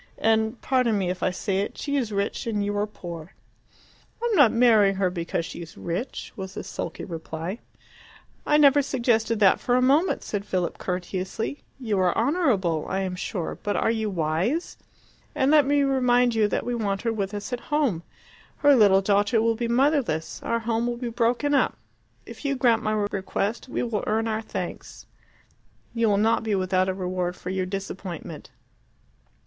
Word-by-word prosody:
And 220 +1 +1
pardon 250 -5 +2
me 185 -2 0
if 180 - -6
I - - +2
say 190 +1 -2
it 200 - -3
she 285 -1 -2
is 245 -6 -1
rich 200 +3 -2
and 210 -3 -1
you 205 0 -2
are 205 +1 0
poor." 170 -4 -9 0.9
"I 475 - -3
am 465 -3 +1
not 285 - +6
marrying 220 -5 +4
her 190 -1 +1
because 170 -1 -3
she - - -8
is 165 - -11
rich," 180 +10 -5
was 190 0 -7
the - - -5
sulky - - -6
reply. 165 +3 -5 0.8
"I 295 - +3
never 285 -1 +6
suggested 235 -5 0
that 195 -2 +5
for 245 - +1
a 255 - +3
moment," 290 +8 +3
said 205 -2 -3
Philip 185 -3 -2
courteously. 185 +7 -3 0.2
"You 220 -6 -1
are 180 -2 +2
honourable, 225 - +1
I 190 - -1
am 185 -1 -3
sure; 180 -1 -4
but 205 - -2
are - - +2
you 220 -2 -1
wise? 180 - -1 0.6
And 265 +2 +2
let 300 -3 +5
me 285 0 +3
remind 250 -3 +3
you 220 -2 +3
that - - -2
we 245 - -2
want 200 -4 -2
her 230 -1 0
with 200 -1 -3
us 205 +5 -5
at 245 - -2
home. 285 - +1 0.6
Her 285 -1 +5
little 200 -5 +5
daughter 205 +3 +2
will 230 +1 +2
be 235 +1 -2
motherless, 245 - +1
our 230 0 -1
home 230 +1 0
will 240 0 -2
be 240 -1 -4
broken 240 +5 +1
up. 270 -4 +2 0.5
If 230 - -11
you 280 -1 0
grant 240 -3 +3
my 215 - -1 0.2
request 200 +4 -2
you - - -1
will 220 -4 -2
earn 220 +1 +1
our 220 0 -1
thanks - - -6 0.9
and 230 - -4
you 225 - +4
will 200 - +3
not 220 +3 +2
be 220 -2 -1
without 185 0 +1
a - - 0
reward 180 -1 -2
for 180 - -6
your 185 -1 -1
disappointment." 185 -4 -6
215 Hz, 190 wpm, -25 LUFS, 190-245 Hz, 0.9 s, not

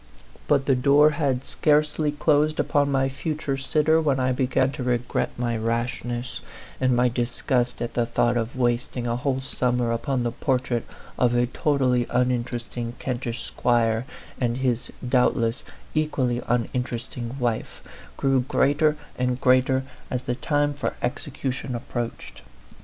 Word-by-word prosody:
But 140 -2 +3
the 135 - +4
door 145 +4 +5
had 140 -4 -1
scarce 150 0 +2
ly 150 -1 +2
closed 150 +1 +2
upon 145 -2 +2
my 135 -1 +2
future 140 +1 -3
sitter 155 +4 +2
when 140 -4 +1
I 130 0 +2
be 130 0 0
gan 130 +1 +2
to 140 - -6
regret 125 0 0
my 120 -1 -1
rashness; 120 +2 -2 0.4
and 130 -1 +3
my 125 +1 +4
disgust 120 +1 0
at 120 - -4
the 120 -1 +1
thought 120 +1 +2
of 115 +1 -2
wasting 120 0 0
a 120 0 0
whole 130 +1 -1
summer 125 -2 0
upon 125 +2 -1
the 120 - 0
portrait 125 -1 -1 0.3
of 120 -1 +3
a 120 0 +3
totally 125 -2 +1
uninteresting 120 -1 -1
Kentish 120 -2 -3
squire, 115 0 +1 0.3
and 120 -1 0
his 125 -3 -1 0.2
doubtless 120 -2 +2 0.3
equally 130 -6 0
uninteresting 120 +1 -2
wife, 120 -3 -2 0.3
grew 135 -1 +2
greater 145 +4 +2 0.2
and 125 0 0
greater 130 +1 +3 0.3
as 125 0 -2
the 125 - -1
time 145 +2 0
for 145 - -3
execution 130 0 -3
approached. 120 0 -5
125 Hz, 145 wpm, -25 LUFS, 120-135 Hz, 0.4 s, door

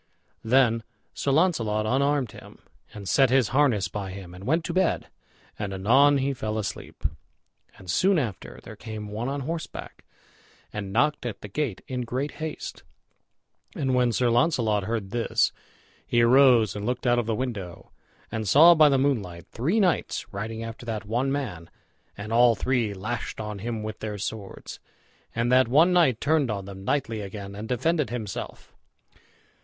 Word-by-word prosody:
Then 115 -1 +3 0.3
Sir - - -2
Launcelot 130 - +2
unarmed 135 +1 +1
him, - - -13 0.3
and 100 -2 -9
set 135 +5 +4
his 130 -3 +3
harness 125 -9 +2
by 95 +1 -5
him, 95 -2 -9
and 90 +2 -10
went 160 +3 +1
to - - -3
bed, 185 -2 +1 0.5
and 105 -2 -3
anon 130 +10 +4
he 135 +1 0
fell 110 -4 -3
asleep. 105 -4 -6 0.7
And 95 - -14
soon 185 - +3
after, 115 - -4
there - - -10
came 110 -1 -7
one 115 +5 -3
on 140 0 -3
horseback 160 +4 -6 0.7
and 100 -2 -5
knocked 145 +8 +1
at 115 - -6
the - - -7
gate 120 -1 -3
in 125 -1 -3
great 130 +4 -3
haste; 155 -1 -5 0.9
and 130 -2 -1
when 125 -1 +3
Sir 120 0 +1
Launcelot 115 - +2
heard 110 -3 -3
this, 120 0 +1 0.6
he 120 0 +3
arose 120 -4 +5
and 105 - -5
looked 125 +4 -2
out 120 0 +3
of 115 - -2
the 115 - 0
window, 105 -9 -5 0.4
and 110 -2 -3
saw 165 - +8
by 155 -2 +6
the 135 - +3
moonlight 105 - -1
three 160 - 0
knights 180 - 0
riding 110 +3 -4
after 115 +2 -8
that 110 -3 -4
one 120 +6 0
man, 120 -13 -4 0.5
and 105 +2 -5
all 120 0 +5
three 120 -1 0
lashed 105 +5 -4
on 105 -2 -5
him 115 +1 -4
with 110 0 -6
their 105 -1 -4
swords, 100 0 -6 0.6
and 120 +1 0
that 130 0 +5
one 160 +9 +5
knight 160 -10 +4
turned 150 -3 +2
on 100 -3 -3
them 95 -1 -9
knightly 125 -3 -1
again 100 0 -7
and 105 +2 -7
defended 150 +5 +1
himself. 110 -5 -6
120 Hz, 170 wpm, -26 LUFS, 105-135 Hz, 0.9 s, saw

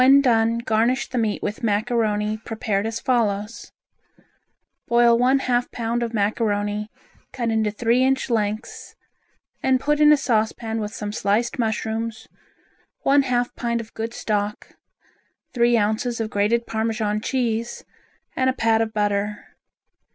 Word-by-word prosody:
When 270 +2 +7
done 230 -3 +3
garnish 235 +2 0
the 255 - -1
meat 220 -2 -1
with 205 - -3
macaroni 215 -1 0
prepared 220 -2 -2
as 225 0 -3
follows: 230 -1 -1 1.2
Boil 235 0 +5
one 250 +3 +3
half 245 -2 0
pound 235 0 -2
of 235 -1 -2
macaroni, 210 -1 -1 0.4
cut 240 -3 -2
into 220 -1 +1
three 235 +4 +1
inch 265 0 +1
lengths 215 -2 -3 0.7
and 260 -1 +2
put 295 +2 0
in 300 0 +7
a 300 - +6
saucepan 225 -2 -1
with 210 -1 -4
some 210 -1 -5
sliced 220 +5 0
mushrooms, 225 0 -2 0.8
one 280 +1 +5
half 245 -2 -1
pint 235 -1 -2
of 230 -1 -9
good 225 +1 -5
stock, 210 -1 -2 0.8
three 240 -1 +3
ounces 220 +3 0
of 220 -1 -3
grated 220 +4 +1
Parmesan 220 -1 -1
cheese, 235 -2 -2 0.5
and 260 0 +2
a - - +1
pat 225 -2 +2
of 220 -1 -2
butter. 205 0 -1
225 Hz, 140 wpm, -23 LUFS, 215-240 Hz, 1.2 s, When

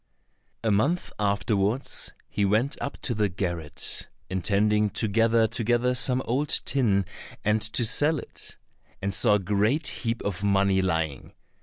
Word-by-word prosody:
A 110 - +2
month 140 - +1
afterwards 105 +3 0 0.2
he 105 - -2
went 110 +8 +2
up 140 - -5
to 125 - -1
the 105 -2 +1
garret, 85 -4 -3 0.2
intending 105 +3 +2
to 110 - -1
gather 115 +2 +3
together 120 +3 +1
some 125 +1 +1
old 135 +5 -1 0.2
tin 110 -7 +1 0.4
and 105 +1 +2
to 115 +2 +1
sell 145 +8 +4
it, - - -7 0.4
and 100 0 -2
saw 105 -1 +5
a - - +1
great 105 - +1 0.2
heap 115 -1 -2
of 100 -1 -3
money 100 -1 +3
lying. 80 -6 -2
105 Hz, 145 wpm, -26 LUFS, 100-120 Hz, 0.4 s, saw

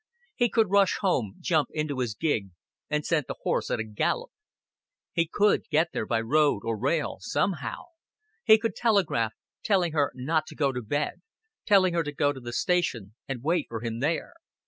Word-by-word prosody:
He 240 -2 +2
could 220 -4 +2
rush 200 -1 +4
home, 125 - 0
jump 160 -5 +1
into 150 -3 -2
his 120 -4 -2
gig, 115 -11 -1 0.4
and 150 0 -1
send 155 -5 +1
the - - -4
horse - - 0
at - - -1
a - - 0
gallop; 110 - -2 0.8
he 165 -2 +1
could 210 0 +2
get 160 +2 +2
there - - -2
by 115 -2 +1
road 145 -1 +2
or 115 0 0
rail, 140 +8 -1
somehow; 195 -7 -2 0.6
he 220 -1 +7
could 225 -3 -2
telegraph, 190 - +1 0.3
telling 185 -5 +2
her 145 -3 +1
not 155 +5 0
to - - -10
go 140 -3 +1
to 125 -1 -4
bed, 145 +9 -2 0.5
telling 190 -4 +5
her 170 - +2
to 150 -2 -4
go 145 0 +1
to 135 - -9
the 120 -1 -7
station 120 - 0
and 130 -3 -5
wait 170 +4 +1
for 115 -1 -5
him 115 -1 -3
there. 150 +5 -1
150 Hz, 190 wpm, -27 LUFS, 125-180 Hz, 0.8 s, he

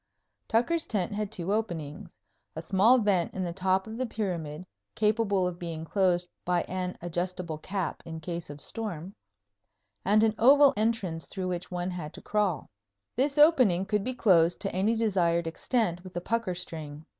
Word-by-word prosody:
Tucker's 315 +9 +1
tent 195 -4 -1
had 210 0 -3
two 190 -1 -2
openings 175 -4 -4 0.4
a 160 - -4
small 205 +8 +5
vent 200 -7 +1
in 190 - -2
the 175 -1 -3
top 190 +1 +1
of 220 0 -7
the 255 0 -1
pyramid, 175 -7 -4 0.3
capable 210 -3 +2
of 180 -1 -3
being 165 -2 -5
closed 180 -1 +1 0.2
by 180 0 +1
an 185 0 -4
adjustable 175 -2 -3
cap 190 -1 -3
in 160 -1 -7
case 170 0 -5
of 145 0 -9
storm, 195 -5 -5 0.9
and 210 +2 +4
an 220 -1 +3
oval 280 +3 +7
entrance 205 -7 -1
through 185 -2 -4
which 180 0 -4
one 180 0 -3
had 170 -4 -6
to - - -10
crawl. 205 -8 0 0.5
This 275 +4 +1
opening 255 - +5
could 210 0 0
be 255 +2 -3
closed 175 -7 +4
to 195 - -2
any 200 +5 +2
desired 180 -7 +1
extent 175 +1 -1
with 185 -1 -11
a 175 - -2
pucker 220 -2 -1
string. 155 -3 -5
185 Hz, 170 wpm, -28 LUFS, 170-215 Hz, 0.9 s, oval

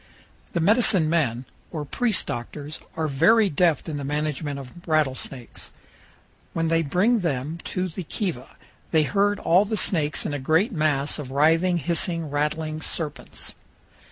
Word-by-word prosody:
The 170 - 0
medicine 190 -3 +4
men, 130 -7 0 0.2
or 155 -3 -5
priest 225 +7 0
doctors, 145 +6 -6 0.2
are 160 -1 0
very 190 +10 +4
deft 165 +1 +2
in 155 -2 -3
the 140 - -4
management 150 0 -2
of 140 +7 -12
rattlesnakes. 135 -5 -2 0.8
When 165 -1 0
they 165 0 +3
bring 185 - +2
them 155 -2 -2
to 185 0 -2
the 185 +2 -6
kiva 170 - -4 0.3
they 160 -2 +3
herd 205 +5 +2
all 175 +3 +4
the 215 +1 -2
snakes 155 -8 0
in - - -2
a 145 - -2
great 160 - +2
mass 150 -4 +1
of 140 -4 -6
writhing, 165 +6 +3
hissing, 165 0 +1
rattling 155 +2 -1
serpents. 155 -3 -4
160 Hz, 150 wpm, -24 LUFS, 145-180 Hz, 0.8 s, medicine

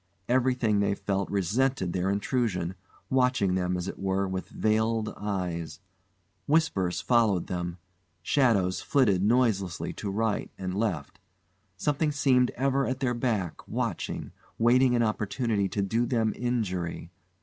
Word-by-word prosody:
Everything, 125 -4 +2
they 100 0 +1
felt, 100 -1 -2
resented 100 +1 0
their 90 +1 0
intrusion, 100 -4 -1 0.4
watching 125 -7 +2
them, 90 -1 0
as 90 +1 -4
it - - -6
were, 95 0 0
with 95 0 -4
veiled 110 0 0
eyes; 90 -6 -3 0.7
whispers 145 - +1
followed 110 -7 +2
them; 90 -1 -4 0.5
shadows 100 -8 +2
flitted 110 -10 +2
noiselessly 105 -5 +1
to 100 - -5
right 110 +2 -1
and 95 -1 -4
left; 100 -2 -2 0.6
something 150 - 0
seemed 135 -3 +3
ever 135 0 +1
at 130 +2 -2
their 130 -2 0
back, 110 -8 -2
watching, - - -3 0.3
waiting 125 +2 +4
an 120 - +3
opportunity 110 -1 0
to 100 - -1
do 115 +5 0
them 115 -3 +1
injury. 95 -9 -2
105 Hz, 130 wpm, -28 LUFS, 95-125 Hz, 0.7 s, waiting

